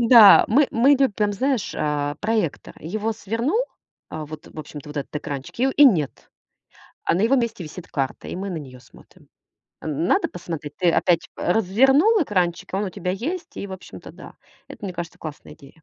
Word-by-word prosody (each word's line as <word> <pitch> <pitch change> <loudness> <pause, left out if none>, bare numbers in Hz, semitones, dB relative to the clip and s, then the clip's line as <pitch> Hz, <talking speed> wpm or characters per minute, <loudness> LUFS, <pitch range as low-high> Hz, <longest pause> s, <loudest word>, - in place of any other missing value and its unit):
Да, 230 -3 +9
мы, 275 +5 +3
мы 240 +5 +4
любим 240 -7 +2
знаешь, 255 +1 -1
а 145 -1 -1
проектор. 210 -8 -1
Его 210 +7 -3
свернул. 230 - -1 0.5
А 155 -1 -5
вот, 155 +1 -10
в - - -16
общем-то, 150 -1 -9
вот 150 - -10
этот 140 0 -5
экранчик 140 - -6
и, 255 - +3
у, - - +1
и 290 - +6
нет. 170 - +2 0.7
А - - +2
на 180 - 0
его 230 +6 +4
месте 235 -6 -1
висит 165 +3 -9
карта, 135 -3 -3
и - - -5
мы 195 +2 -4
на 175 - -4
неё 130 -5 -9
смотрим. 125 - -20 0.5
Н 155 +1 -2
надо - - +2
посмотреть? 160 -4 -7
Ты 175 -2 +3
опять, 170 0 +2
э, 175 - 0
развернул 270 - +4
экранчик, 180 - -1
и - - -1
он 200 - 0
у - - -2
тебя 180 0 -3
есть. 320 - -4
И, - - -4
общем-то, 190 -2 -10
да. - - -13 0.3
Это, 205 - -8
мне 185 - -6
кажется, 170 -1 -6
классная 155 -2 -9
идея. 150 +2 -17
190 Hz, 195 wpm, -23 LUFS, 155-230 Hz, 0.7 s, Да